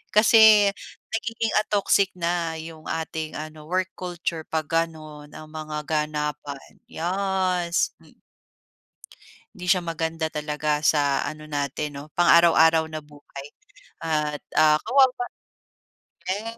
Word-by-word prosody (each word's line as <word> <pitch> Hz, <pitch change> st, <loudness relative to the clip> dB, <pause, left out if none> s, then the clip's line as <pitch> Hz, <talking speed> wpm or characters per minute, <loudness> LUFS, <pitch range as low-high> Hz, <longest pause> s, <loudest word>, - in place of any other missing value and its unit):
kasi 215 Hz, -1 st, +7 dB, 0.4 s
nagiging, 225 Hz, 0 st, -2 dB
ah, 215 Hz, -, -2 dB
toxic 200 Hz, -1 st, +2 dB
na 170 Hz, -1 st, -1 dB
'yong 160 Hz, 0 st, -9 dB
ating 160 Hz, -1 st, -4 dB
ano 155 Hz, 0 st, -8 dB
work 185 Hz, +2 st, 0 dB
culture 175 Hz, -3 st, -4 dB
'pag 155 Hz, -2 st, -3 dB
gano'n 155 Hz, -3 st, -3 dB
ang 155 Hz, -, -10 dB
mga 155 Hz, -1 st, -5 dB
ganapan. 150 Hz, -2 st, -3 dB, 0.2 s
Yes 185 Hz, -1 st, -1 dB
m -, -, -21 dB, 1.4 s
Hindi 180 Hz, -4 st, -8 dB
siya 180 Hz, -1 st, +3 dB
maganda 160 Hz, -1 st, -3 dB
talaga 150 Hz, 0 st, -1 dB
sa 145 Hz, -2 st, +2 dB
ano 155 Hz, 0 st, -7 dB
natin 145 Hz, 0 st, -3 dB
'no -, -, -8 dB
pang 175 Hz, -, +4 dB
araw-araw 160 Hz, -1 st, +5 dB
na 155 Hz, -1 st, -7 dB
buhay 145 Hz, -2 st, -12 dB, 0.6 s
at, 150 Hz, -2 st, -1 dB, 0.2 s
ah, 155 Hz, -1 st, +6 dB
kawawa 265 Hz, 0 st, +5 dB, 1.2 s
yes. 215 Hz, +5 st, -3 dB
160 Hz, 120 wpm, -24 LUFS, 150-180 Hz, 1.4 s, kasi